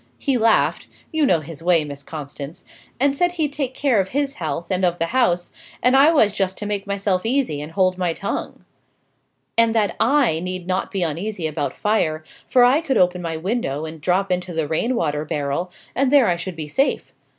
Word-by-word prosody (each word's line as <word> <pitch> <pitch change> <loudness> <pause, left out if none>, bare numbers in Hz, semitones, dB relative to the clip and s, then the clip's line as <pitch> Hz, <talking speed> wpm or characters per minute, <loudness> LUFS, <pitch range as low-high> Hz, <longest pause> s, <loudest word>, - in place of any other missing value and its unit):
He 275 -2 0
laughed 225 -1 +2 0.2
you 315 -3 +2
know 170 -8 +3
his 155 +1 -10
way, 170 -2 +3
Miss 140 -1 -8
Constance 145 0 -8 0.4
and 275 +1 +2
said 355 +4 +1
he'd 310 -5 -1
take 270 -3 -3
care 265 -7 +2
of 190 - -5
his 280 +2 -1
health 170 - -3
and 185 0 0
of 175 -1 +2
the 165 - 0
house, 180 -9 +1 0.3
and 250 +2 +5
I 285 +4 +7
was 220 -11 +3
just 190 -2 -1
to 210 - -5
make 205 -1 -3
myself 195 -2 0
easy 235 - 0
and 150 +2 -8
hold 185 -1 +1
my 180 -2 +1
tongue, 200 - -5 0.9
and 230 0 +4
that 205 -5 +1
I 245 - +3
need 180 0 -4
not 185 +1 -1
be 195 -3 -1
uneasy 170 +3 -3
about 145 -3 -3
fire, 160 -8 0 0.2
for 250 - +5
I 260 +6 +5
could 285 -5 0
open 180 0 +2
my 165 -2 -3
window 160 - -2
and 160 -1 -8
drop 185 +3 +1
into 180 0 -1
the 160 -2 -1
rain 230 - 0
water 150 -7 -1
barrel, 150 +4 -2 0.2
and 265 +1 +1
there 280 -5 +6
I 175 - +2
should 175 +1 -5
be 155 -2 -5
safe. 270 - 0
185 Hz, 205 wpm, -21 LUFS, 165-245 Hz, 0.9 s, I